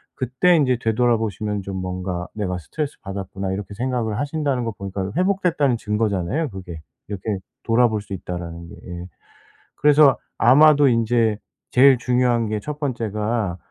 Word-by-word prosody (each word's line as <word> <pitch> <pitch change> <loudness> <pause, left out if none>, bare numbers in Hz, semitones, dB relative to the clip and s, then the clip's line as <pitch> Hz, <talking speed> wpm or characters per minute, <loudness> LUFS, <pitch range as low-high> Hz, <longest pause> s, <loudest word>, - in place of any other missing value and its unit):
그때 130 +8 +2
인제 130 -6 +3
되돌아보시면 110 -3 0
좀 95 0 -6
뭔가 90 -1 -4
'내가 95 -4 -2
스트레스받았구나.' 95 - -5
이렇게 100 +1 -6
생각을 120 -2 -2
하신다는 145 -3 -1
거 115 - -2
보니까 100 -1 -5
회복됐다는 180 -8 +1
증거잖아요. 105 - -1
그게 90 -6 -8 0.3
이렇게 100 0 -3 0.3
돌아볼 115 -2 +2
수 100 - -9
있다라는 85 -2 -6
게 - - -11 0.3
예. - - -7 0.7
그래서 145 -2 +5 0.6
아마도 145 -1 +5
인제 115 -2 +2 0.3
제일 130 +1 +6
중요한 125 -1 +1
게 105 -1 -2
1 150 +4 -6
번째가 110 - -2
110 Hz, 345 characters per minute, -22 LUFS, 95-130 Hz, 0.7 s, 제일